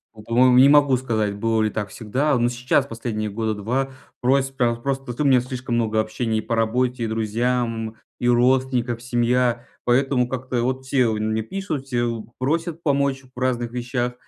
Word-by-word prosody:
ну, 105 Hz, -, -12 dB
по-моему, 125 Hz, +2 st, +4 dB
не 135 Hz, +2 st, +8 dB
могу 145 Hz, -3 st, +5 dB
сказать, 110 Hz, -5 st, -1 dB
было 115 Hz, +1 st, 0 dB
ли 110 Hz, -, +2 dB
так 105 Hz, -1 st, -4 dB
всегда. 130 Hz, +7 st, -1 dB
Э, 130 Hz, -, +3 dB
но 120 Hz, +1 st, +2 dB
сейчас, 125 Hz, +1 st, +1 dB
последние 110 Hz, -2 st, -4 dB
года 110 Hz, +1 st, -2 dB
2, 125 Hz, +6 st, -2 dB, 0.3 s
просьб 135 Hz, +1 st, +1 dB
прям 120 Hz, -2 st, +1 dB
просто 135 Hz, -2 st, -3 dB
т 125 Hz, -, -5 dB
у -, -, +1 dB
меня 130 Hz, -2 st, +5 dB
слишком 125 Hz, -1 st, -4 dB
много 110 Hz, -2 st, +1 dB
общения 110 Hz, +1 st, -1 dB
и -, -, -2 dB
по 115 Hz, -, -2 dB
работе, 120 Hz, +2 st, 0 dB
и -, -, 0 dB
друзьям, 115 Hz, 0 st, -1 dB, 0.2 s
и 120 Hz, -, 0 dB
родственников 120 Hz, -1 st, +2 dB
семья, 120 Hz, 0 st, +1 dB, 0.2 s
поэтому 125 Hz, 0 st, +2 dB
как-то 125 Hz, -1 st, -2 dB
вот 130 Hz, +1 st, -2 dB
все 130 Hz, -2 st, +2 dB
мне 110 Hz, +1 st, -1 dB
пишут, 160 Hz, -, -4 dB
все 120 Hz, -3 st, 0 dB
вот 115 Hz, -2 st, -3 dB
просят 165 Hz, +5 st, -1 dB
помочь 140 Hz, -3 st, 0 dB
в -, -, -7 dB
разных 120 Hz, -2 st, -1 dB
вещах. 125 Hz, 0 st, -2 dB
120 Hz, 190 wpm, -22 LUFS, 115-130 Hz, 0.3 s, не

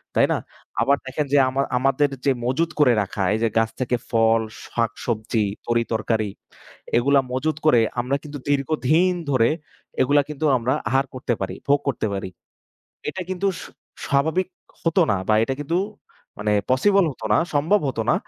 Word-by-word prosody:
তাই -, -, +5 dB
না? -, -, +2 dB, 0.4 s
আবার 140 Hz, +1 st, +3 dB
দেখেন 135 Hz, +3 st, -2 dB
যে -, -, +6 dB
আমা 130 Hz, -, +5 dB
আমার 135 Hz, +1 st, 0 dB
আমাদের 135 Hz, +2 st, +2 dB, 0.2 s
যে 140 Hz, -, +4 dB
মজুত 160 Hz, +7 st, +1 dB
করে 135 Hz, -5 st, +6 dB
রাখা 95 Hz, 0 st, -3 dB
এই 110 Hz, -, 0 dB
যে 115 Hz, -, +3 dB
গাছ 115 Hz, 0 st, +3 dB
থেকে 125 Hz, -1 st, 0 dB, 0.2 s
ফল, 115 Hz, 0 st, +4 dB, 0.3 s
শাকসবজি, 110 Hz, -1 st, -1 dB, 0.2 s
তরিতরকারি 115 Hz, -2 st, 0 dB, 0.7 s
এগুলা 140 Hz, +3 st, +4 dB
মজুত 150 Hz, +3 st, -1 dB
করে 140 Hz, -6 st, +6 dB, 0.2 s
আমরা 130 Hz, +3 st, -1 dB
কিন্তু 145 Hz, -1 st, -7 dB
দীর্ঘদিন 155 Hz, +5 st, +2 dB, 0.2 s
ধরে 120 Hz, -4 st, +4 dB, 0.5 s
এগুলা 145 Hz, +3 st, +4 dB
কিন্তু 150 Hz, +1 st, -3 dB
আমরা 125 Hz, +2 st, 0 dB, 0.2 s
আহার 135 Hz, +1 st, +2 dB
করতে 125 Hz, -1 st, -2 dB
পারি, 95 Hz, -1 st, -3 dB
ভোগ 145 Hz, +1 st, +4 dB
করতে 130 Hz, -5 st, 0 dB
পারি। 95 Hz, -1 st, -4 dB, 0.8 s
এটা 185 Hz, +4 st, -3 dB
কিন্তু 185 Hz, +1 st, -1 dB
স -, -, -9 dB, 0.4 s
স্বাভাবিক 160 Hz, +7 st, +1 dB, 0.3 s
হতো 165 Hz, +2 st, +2 dB
না 100 Hz, -, +2 dB
বা 110 Hz, -, +4 dB
এটা 135 Hz, -, -2 dB
কিন্তু 155 Hz, +4 st, -1 dB, 0.6 s
মানে 105 Hz, 0 st, 0 dB, 0.2 s
পসিবল 195 Hz, +9 st, +4 dB
হতো 115 Hz, -4 st, -7 dB
না, -, -, +5 dB, 0.2 s
সম্ভব 165 Hz, +8 st, +3 dB
হত 130 Hz, -, -4 dB
না। -, -, +4 dB
135 Hz, 165 wpm, -23 LUFS, 115-150 Hz, 0.8 s, যে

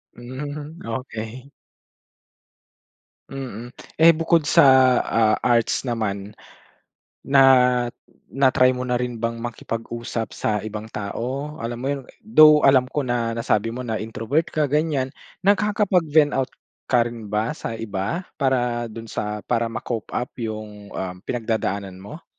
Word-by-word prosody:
Hmm, 145 Hz, +6 st, -7 dB
okey. 115 Hz, +1 st, -6 dB, 1.8 s
Mm. 125 Hz, -3 st, -7 dB, 0.2 s
Eh 165 Hz, +1 st, +7 dB
bukod 165 Hz, 0 st, +2 dB
sa, -, -, +5 dB, 0.4 s
ah, 110 Hz, -1 st, +2 dB
arts 120 Hz, +2 st, +1 dB
naman, 105 Hz, -3 st, -3 dB, 0.9 s
na 135 Hz, 0 st, +6 dB, 0.9 s
na-try 130 Hz, -1 st, +4 dB
mo 125 Hz, -, -4 dB
na 125 Hz, -, 0 dB
rin 125 Hz, -1 st, -3 dB
bang 115 Hz, +1 st, -1 dB
makipag-usap 115 Hz, 0 st, -5 dB
sa 105 Hz, -1 st, 0 dB
ibang 110 Hz, 0 st, -6 dB
tao? 130 Hz, +8 st, -4 dB
Alam 115 Hz, +1 st, -4 dB
mo -, -, -3 dB
yu 140 Hz, -, -1 dB, 0.2 s
though 155 Hz, -8 st, +7 dB
alam 130 Hz, -2 st, +5 dB
ko 145 Hz, +3 st, -2 dB
na 120 Hz, -2 st, -1 dB
nasabi 115 Hz, -1 st, 0 dB
mo 125 Hz, -, -4 dB
na 115 Hz, -3 st, -3 dB
introvert 115 Hz, +8 st, -1 dB
ka 150 Hz, -3 st, -1 dB
ganyan, 150 Hz, -3 st, 0 dB, 0.3 s
nagkakapag-vent 190 Hz, -7 st, +3 dB
out 135 Hz, -1 st, 0 dB, 0.4 s
ka 120 Hz, -2 st, +3 dB
rin 115 Hz, -2 st, -9 dB
ba 105 Hz, +3 st, -1 dB
sa 115 Hz, -, -5 dB
iba? 110 Hz, -, -3 dB, 0.2 s
Para 125 Hz, -4 st, 0 dB
dun 115 Hz, 0 st, -9 dB
sa 105 Hz, 0 st, -3 dB
para 115 Hz, -1 st, 0 dB
ma-cope 115 Hz, 0 st, -5 dB
up 125 Hz, -, -2 dB
yung 110 Hz, -3 st, -6 dB
um 90 Hz, -1 st, -4 dB
pinagdadaanan 105 Hz, -5 st, -2 dB
mo? 125 Hz, -, -11 dB
120 Hz, 130 wpm, -23 LUFS, 110-140 Hz, 1.8 s, Eh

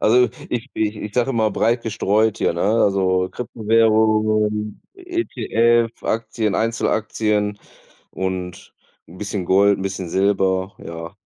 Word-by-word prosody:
Also 125 Hz, +2 st, +4 dB, 0.2 s
ich 120 Hz, +2 st, -3 dB
ich 110 Hz, -1 st, -1 dB
ich 105 Hz, 0 st, -7 dB
sage 125 Hz, +2 st, +1 dB
immer 110 Hz, -3 st, +1 dB
breit 115 Hz, +3 st, +1 dB
gestreut 110 Hz, -1 st, +1 dB
hier, -, -, +1 dB
ne? 85 Hz, -, -4 dB
Also 95 Hz, -3 st, +2 dB
Kryptowährungen, 110 Hz, -2 st, +1 dB
ETF, 120 Hz, -, +1 dB
Aktien, 110 Hz, -2 st, -1 dB
Einzelaktien 105 Hz, -2 st, 0 dB, 0.5 s
und 95 Hz, -1 st, -5 dB, 0.3 s
'n 90 Hz, +3 st, -13 dB
bisschen 100 Hz, -3 st, -4 dB
Gold, 100 Hz, +1 st, +4 dB
'n -, -, -4 dB
bisschen 95 Hz, -2 st, -4 dB
Silber, 95 Hz, 0 st, +1 dB
ja. 85 Hz, +2 st, -8 dB
105 Hz, 120 wpm, -21 LUFS, 95-115 Hz, 0.5 s, Also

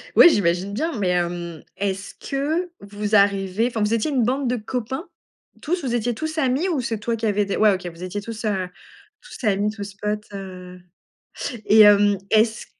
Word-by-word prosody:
Oui, 345 Hz, -, +10 dB
j'imagine 190 Hz, -, +1 dB
bien, 305 Hz, +2 st, -2 dB
mais, 190 Hz, -3 st, 0 dB
hem, 175 Hz, -2 st, -2 dB
est-ce 195 Hz, -1 st, -3 dB
que 310 Hz, +6 st, -2 dB
vous 205 Hz, +1 st, -2 dB
arrivez 200 Hz, +2 st, +3 dB
enfin, 230 Hz, -3 st, -3 dB
vous 210 Hz, +2 st, +1 dB
étiez 230 Hz, +7 st, 0 dB
une 255 Hz, -4 st, +2 dB
bande 260 Hz, +2 st, 0 dB
de 250 Hz, -, +1 dB
copains? 250 Hz, -, -4 dB, 0.5 s
Tous, 350 Hz, +1 st, -2 dB
vous 240 Hz, -2 st, -1 dB
étiez 240 Hz, +1 st, 0 dB
tous 315 Hz, +3 st, -4 dB
amis? 275 Hz, +5 st, +1 dB
Ou 295 Hz, -7 st, 0 dB
c'est 225 Hz, -3 st, -3 dB
toi 230 Hz, +1 st, -1 dB
qui 225 Hz, 0 st, -4 dB
avais 205 Hz, -1 st, +1 dB
des 200 Hz, -, -2 dB
ouais, 215 Hz, -2 st, +5 dB
OK, 185 Hz, -1 st, -5 dB
vous 170 Hz, +1 st, -9 dB
étiez 205 Hz, +3 st, -4 dB
tous 225 Hz, +1 st, -7 dB
a 190 Hz, -3 st, -1 dB, 0.5 s
tous -, -, -12 dB
amis, 205 Hz, 0 st, +1 dB
tous 200 Hz, -2 st, -8 dB
potes, 210 Hz, +1 st, -3 dB
heu 185 Hz, -2 st, -8 dB, 0.9 s
et 220 Hz, -, +6 dB
hem, 205 Hz, -1 st, +6 dB
est-ce 220 Hz, +1 st, +2 dB
210 Hz, 190 wpm, -22 LUFS, 195-245 Hz, 0.9 s, Oui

